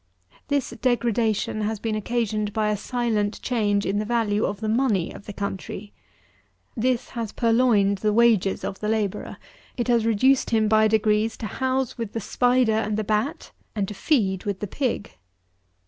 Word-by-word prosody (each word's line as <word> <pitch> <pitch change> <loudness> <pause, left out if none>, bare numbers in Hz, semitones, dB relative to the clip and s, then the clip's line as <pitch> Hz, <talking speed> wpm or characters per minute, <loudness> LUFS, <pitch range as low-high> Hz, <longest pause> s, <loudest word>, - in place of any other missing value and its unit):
This 285 -2 0
degradation 230 -4 0
has 215 +1 -1
been 225 +1 -2
occasioned 215 -1 -1
by 215 0 +1
a - - +1
silent 215 -2 -1
change 205 -5 +1
in 200 +2 0
the - - 0
value 220 -2 +1
of 200 -1 -3
the 220 - -3
money 220 -6 +1
of - - -12
the - - -5
country. 200 0 -5 0.8
This 250 +1 0
has 230 -4 -4
purloined 225 -4 +3
the 210 +1 +1
wages 220 -4 +3
of 195 - -4
the 210 - -2
labourer; 215 -3 -2 0.4
it 240 - -1
has 235 -2 +3
reduced 255 +5 +3
him 220 -2 +2
by 215 0 +4
degrees 215 0 +1
to - - -6
housel 260 +2 -1
with 225 -3 -4
the 230 - -2
spider 245 +2 +2
and 215 -1 0
the 215 - 0
bat, 215 +7 -2 0.2
and 200 -2 -1
to - - -5
feed 195 - +1
with 200 -2 -3
the - - -3
pig. 240 +1 -2
220 Hz, 175 wpm, -24 LUFS, 205-235 Hz, 0.8 s, by